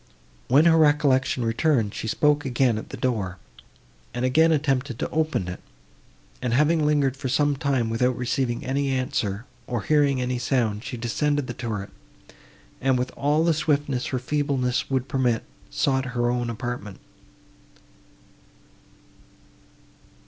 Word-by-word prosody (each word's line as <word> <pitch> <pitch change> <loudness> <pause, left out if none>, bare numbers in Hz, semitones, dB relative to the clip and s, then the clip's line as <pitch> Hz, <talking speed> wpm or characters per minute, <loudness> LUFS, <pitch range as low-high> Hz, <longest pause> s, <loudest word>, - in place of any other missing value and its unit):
When 140 +6 +5
her 165 -1 +5
recollection 140 -5 +3
returned, 115 -2 +1
she - - -5
spoke 150 +5 +2
again 125 -4 +1
at - - -10
the - - -7
door, 100 -8 -2 0.8
and 125 +1 -1
again 160 +6 +4
attempted 140 -4 0
to - - -3
open 155 - 0
it, 90 - -6 0.8
and, 120 -1 0
having 150 +3 +3
lingered 145 -3 +2
for 135 -1 -4
some 145 +2 +2
time, 135 -5 0
without 125 +2 0
receiving 125 -1 -1
any 140 +1 0
answer, 120 -5 -1 0.2
or 120 -5 -2
hearing 145 -1 +2
a 125 0 -1
sound, 115 -4 0
she 130 -2 -5
descended 145 +5 0
the 120 - -5
turret, 110 -5 -5 0.9
and, 130 -1 +2
with 125 +1 -2
all 150 +3 +1
the 165 0 +3
swiftness 145 -4 0
her 130 - -2
feebleness 135 -1 -1
would 130 -1 -1
permit, 125 -4 0 0.3
sought 130 - 0
her 120 0 +2
own 120 -1 -1
apartment. 115 -3 -5
130 Hz, 140 wpm, -24 LUFS, 120-145 Hz, 0.9 s, When